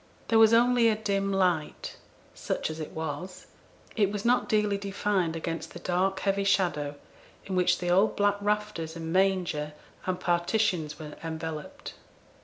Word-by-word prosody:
There 225 - +5
was 220 0 +7
only 235 0 +5
a 220 - +2
dim 200 -2 -1
light; 180 -5 0 0.4
such - - -3
as 160 - -7
it 155 - -5
was, 160 +4 -6 0.5
it 205 -3 +3
was 205 0 -4
not 245 +1 +2
dearly 210 -2 +2
defined 195 -4 -1
against 165 0 -4
the 175 - -8
dark 190 +2 0
heavy 200 0 +1
shadow 170 -7 +1 0.5
in 190 - -3
which 180 -1 +3
the 175 - -3
old 195 +4 +3
black 205 0 +2
rafters 210 -6 -2
and 165 0 -5
manger 180 -6 +1 0.3
and 185 -1 -1
partitions 175 -3 0
were 150 -2 -9
enveloped. 160 -1 -6
185 Hz, 155 wpm, -28 LUFS, 165-205 Hz, 0.5 s, was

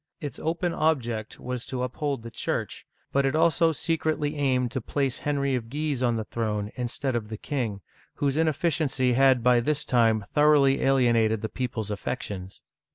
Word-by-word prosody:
Its 145 -5 -6
open 170 +2 -1
object 120 -8 -1
was 125 -1 -4
to 125 -1 -3
up 125 -1 -5
hold 140 -6 -2
the 115 - -8
Church, - - -3 0.2
but 140 - +2
it 135 +2 +1
also 165 +1 +4
secretly 155 -2 -1
aimed 130 -4 +1
to 130 - -3
place 135 +2 -1
Henry 140 -2 0
of 115 -3 -2
Guise 145 -1 -2
on 120 -2 +2
the 110 - -2
throne 105 -2 -3
instead 125 +1 -3
of 110 -3 -3
the 110 - -5
king, 115 -7 -3 0.3
whose 140 -1 0
ineffi 160 +1 +2
ciency 130 -4 +1
had 130 -1 +4
by 125 -1 +5
this 150 +5 0
time 115 -5 +3
thoroughly 145 -1 +4
alienated 115 -5 +3
the 110 - -2
people's 115 -5 -3
affections. 100 -3 -5
130 Hz, 175 wpm, -26 LUFS, 115-145 Hz, 0.3 s, by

